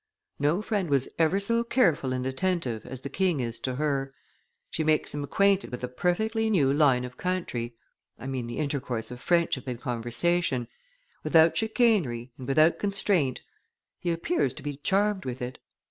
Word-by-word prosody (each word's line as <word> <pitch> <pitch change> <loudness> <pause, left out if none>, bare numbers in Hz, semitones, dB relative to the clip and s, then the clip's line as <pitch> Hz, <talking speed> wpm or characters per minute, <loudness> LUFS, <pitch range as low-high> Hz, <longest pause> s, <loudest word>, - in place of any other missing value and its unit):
No 150 +8 +1
friend 200 -7 -1
was 140 -2 +2
ever 165 +4 +3
so 230 +4 +1
careful 170 - +2
and 130 0 -2
attentive 130 - -1
as 130 0 -7
the 140 - -6
king 185 -6 +1
is 115 -2 -3
to 130 -1 -3
her; 135 -1 -1 0.6
she 160 - -1
makes 155 0 +1
him 145 0 -3
acquainted 200 +6 +2
with 125 0 -7
a - - 0
perfectly 220 - 0
new 145 -10 +3
line 135 -4 +3
of 125 0 -10
country 130 -11 -3 0.4
I 120 - -10
mean 130 -3 -3
the 120 - -5
intercourse 140 -6 -2
of 125 0 -8
friendship 170 -7 +1
and 125 -2 -4
conversation, 125 +3 0 0.6
without 165 -1 +5
chicanery 205 - +1
and 125 - -7
without 155 +4 +4
constraint; 195 -9 +1 0.6
he 175 - -2
appears 245 - 0
to 145 - -10
be 145 -1 -4
charmed 195 +5 +1
with 130 -1 -5
it." 125 0 -5
145 Hz, 170 wpm, -27 LUFS, 125-185 Hz, 0.6 s, without